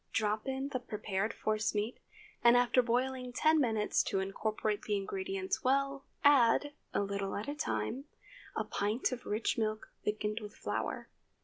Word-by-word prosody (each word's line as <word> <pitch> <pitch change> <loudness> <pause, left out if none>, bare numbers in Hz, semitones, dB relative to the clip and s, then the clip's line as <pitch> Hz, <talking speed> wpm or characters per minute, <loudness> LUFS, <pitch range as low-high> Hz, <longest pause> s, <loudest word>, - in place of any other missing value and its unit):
Drop 215 +2 0
in 265 +1 -2
the 260 -3 -2
prepared 210 -3 -2
force 215 0 -1
meat, 210 +4 -1 0.4
and 240 0 +8
after 245 +1 +4
boiling 250 +1 0
ten 310 +5 +4
minutes 220 -5 +2
to 195 - -1
incorporate 210 +2 -1
the 210 -1 0
ingredients 380 - -2
well, 275 +1 +1 0.2
add, 285 +1 +5 0.2
a - - +1
little 200 -1 -2
at 210 - -4
a 290 - -1
time, 275 -3 -2 0.5
a - - +1
pint 210 +7 0
of 250 -1 -5
rich 215 +2 0
milk 215 -1 -1
thickened 210 +1 -1
with 210 -1 -9
flour. - - -3
230 Hz, 155 wpm, -33 LUFS, 210-265 Hz, 0.5 s, and